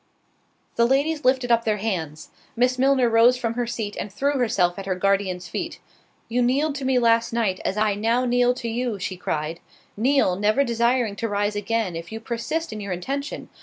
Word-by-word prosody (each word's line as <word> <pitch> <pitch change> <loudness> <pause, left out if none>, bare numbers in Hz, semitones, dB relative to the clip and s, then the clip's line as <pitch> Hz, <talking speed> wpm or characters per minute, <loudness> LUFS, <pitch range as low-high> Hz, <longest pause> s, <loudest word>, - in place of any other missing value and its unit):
The 235 0 +4
ladies 290 +4 +1
lifted 255 -1 +2
up 230 0 +4
their 215 -2 0
hands!—Miss 205 - -3
Milner 265 -1 +4
rose 230 +2 +5
from 230 -2 -2
her 240 0 -2
seat, 220 -3 -4
and 200 - -5
threw 280 +6 0
herself 195 -7 +1
at 195 - -7
her 185 - 0
guardian's 185 -1 0
feet. - - -5 0.5
"You 245 +2 0
kneeled 280 +5 +2
to 270 - -5
me 260 -1 +2
last 230 -1 +3
night, 215 -6 0
I 210 +1 +1
now 230 +5 +1
kneel 245 0 +3
to 235 - -5
you," 235 -1 -2
(she 185 0 -4
cried) 160 -2 -3 0.4
"kneel, 245 -4 +2
never 215 +8 +2
desiring 235 -2 +1
to 230 - -2
rise 205 +1 0
again, 205 -3 -1
if 165 +3 -7
you 220 - -5
persist 235 +6 -3
in 215 - -6
your 200 -2 -3
intention. 275 +11 -4
230 Hz, 190 wpm, -23 LUFS, 200-250 Hz, 0.5 s, rose